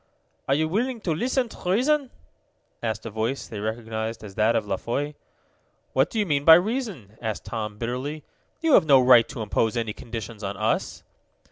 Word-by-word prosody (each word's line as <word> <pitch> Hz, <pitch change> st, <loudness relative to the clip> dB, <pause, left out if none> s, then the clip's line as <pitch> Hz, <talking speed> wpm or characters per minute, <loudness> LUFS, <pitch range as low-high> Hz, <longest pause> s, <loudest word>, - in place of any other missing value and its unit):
"Are 135 Hz, -, +3 dB
you 155 Hz, +2 st, +1 dB
willing 235 Hz, +8 st, -1 dB
to 170 Hz, -5 st, 0 dB
listen 250 Hz, -, 0 dB
to 180 Hz, -, -7 dB
reason?" 270 Hz, +6 st, +2 dB, 0.7 s
asked 110 Hz, -1 st, -3 dB
a 115 Hz, -, -5 dB
voice 110 Hz, +5 st, -2 dB
they 110 Hz, -, -7 dB
recognized 110 Hz, +1 st, -4 dB
as 100 Hz, -2 st, -9 dB
that 110 Hz, +3 st, +2 dB
of -, -, +1 dB
La 100 Hz, -1 st, -1 dB
Foy. 145 Hz, +8 st, -3 dB, 0.8 s
"What 135 Hz, +3 st, +3 dB
do -, -, -5 dB
you 210 Hz, -, +2 dB
mean 145 Hz, -5 st, 0 dB
by 160 Hz, +2 st, +10 dB
reason?" 180 Hz, -, -2 dB
asked 110 Hz, -3 st, -4 dB
Tom 105 Hz, -2 st, -4 dB
bitterly. 130 Hz, +6 st, -4 dB, 0.4 s
"You 325 Hz, -3 st, +3 dB
have 160 Hz, -, +6 dB
no 135 Hz, -3 st, +7 dB
right 125 Hz, -2 st, +6 dB
to 115 Hz, -, -5 dB
impose 110 Hz, +2 st, 0 dB
any 115 Hz, -2 st, -2 dB
conditions 110 Hz, -2 st, -7 dB
on 100 Hz, 0 st, -4 dB
us." -, -, -1 dB
120 Hz, 190 wpm, -25 LUFS, 110-165 Hz, 0.8 s, by